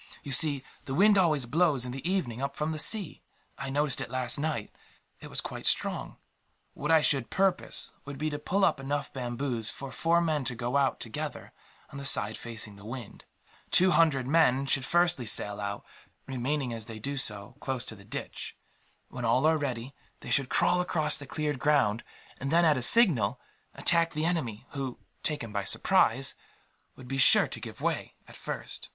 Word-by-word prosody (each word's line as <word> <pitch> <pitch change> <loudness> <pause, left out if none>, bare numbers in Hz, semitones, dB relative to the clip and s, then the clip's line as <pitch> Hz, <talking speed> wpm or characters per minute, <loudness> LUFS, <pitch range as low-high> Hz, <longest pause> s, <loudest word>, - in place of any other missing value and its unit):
You 140 - -7
see, 140 0 +3 0.2
the 135 - -4
wind 205 +4 +5
always 155 -9 +2
blows, 145 -1 +2
in 125 - -5
the 135 +7 -4
evening, 135 -11 -2
up 140 0 -3
from 150 +1 -2
the 155 - -4
sea. 205 +2 +2 0.3
I 135 - -6
noticed 145 0 +1
it - - -5
last 130 +1 0
night. 150 -8 -3 0.5
It - - -10
was - - -3
quite - - -6
strong. - - -1 0.6
What 150 - -5
I 160 -1 +6
should 135 -5 +2
propose 195 -1 0
would 140 -1 -8
be 155 +2 -2
to 145 - -4
pull 195 +6 +1
up 155 -5 +1
enough 140 +1 -3
bamboos 120 -2 -3
for 140 -1 -8
four 165 +4 +2
men 155 -4 0
to 125 - -1
go 120 +2 -3
out, 140 -2 +2
together, - - -6 0.4
on 140 - -8
the 140 - -6
side 110 -5 +4
facing 110 -3 -6
the 100 - -14
wind. 115 0 -9 0.4
Two 185 +1 +6
hundred 155 -7 +3
men 140 -2 +3
should 135 -1 +1
first 175 -5 +2
sally 105 -1 +2
out; 100 0 -5 0.4
remaining, 130 0 -2
as 115 -1 -6
they 110 -2 -8
do 140 +6 -4
so, 105 -3 -2
close 130 -2 -3
to 110 - -6
the 100 - -15
ditch. 105 - -7 0.5
When 125 -1 -7
all 120 +5 +2
are 160 0 +4
ready, 130 -2 -4 0.3
they - - -7
should 135 -2 +2
crawl 180 +7 +3
across 155 -3 +1
the 145 - -10
cleared 150 -2 -3
ground 135 -7 +2 0.4
and 140 - -3
then, 170 +1 +4
at 155 -2 +4
a 130 - -2
signal, 140 - +5 0.4
attack 170 -1 +2
the 155 +1 -1
enemy 135 -10 -2
who, 135 -3 -5 0.2
taken 135 -8 0
by 100 -2 -1
surprise, 135 - +2 0.6
would 130 - -13
be 135 +1 -3
sure - - +7
to - - -7
give - - -9
way, - - -2
at - - -14
first. - - -7
135 Hz, 195 wpm, -29 LUFS, 120-155 Hz, 0.6 s, sure